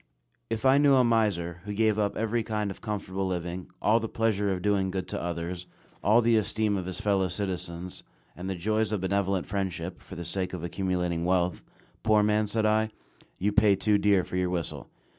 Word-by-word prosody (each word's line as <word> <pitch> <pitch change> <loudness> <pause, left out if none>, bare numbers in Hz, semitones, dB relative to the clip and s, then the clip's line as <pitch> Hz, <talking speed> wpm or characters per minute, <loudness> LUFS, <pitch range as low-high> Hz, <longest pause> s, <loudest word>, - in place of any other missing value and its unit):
If 115 +1 -3
I 135 +2 +6
knew 145 -1 +5
a 130 - +5
miser, 100 -8 +1
who 105 - -4
gave 110 0 +2
up 100 -1 0
every 115 +1 0
kind 105 -2 -2
of - - -11
comfortable 95 -3 -3
living, 90 0 -4 0.2
all 110 +2 +4
the 115 -1 -4
pleasure 105 -3 +1
of 90 -1 -3
doing 100 -2 +2
good 95 -1 -3
to - - -3
others, 85 +1 -4 0.4
all 110 +3 +5
the 115 0 +4
esteem 110 0 0
of 95 -2 -3
his 95 - -5
fellow 100 -2 +2
citizens, 90 -2 -4 0.3
and 90 +2 -5
the 95 - -2
joys 110 +4 0
of 105 -4 -1
benevolent 95 -1 0
friendship, 90 -3 -3
for 95 - -10
the 85 -1 -6
sake 95 +1 -2
of 90 -3 -5
accumulating 90 -2 -1
wealth 90 0 +1 0.4
"Poor 110 -2 +4
man," 105 0 +2
said 110 +1 0
I, 110 0 +2 0.5
"you 100 +3 +1
pay 105 -1 +5
too 105 +1 +2
dear 100 -3 +3
for 90 - -4
your 90 -1 +1
whistle." 85 -3 -4
100 Hz, 200 wpm, -28 LUFS, 90-110 Hz, 0.5 s, I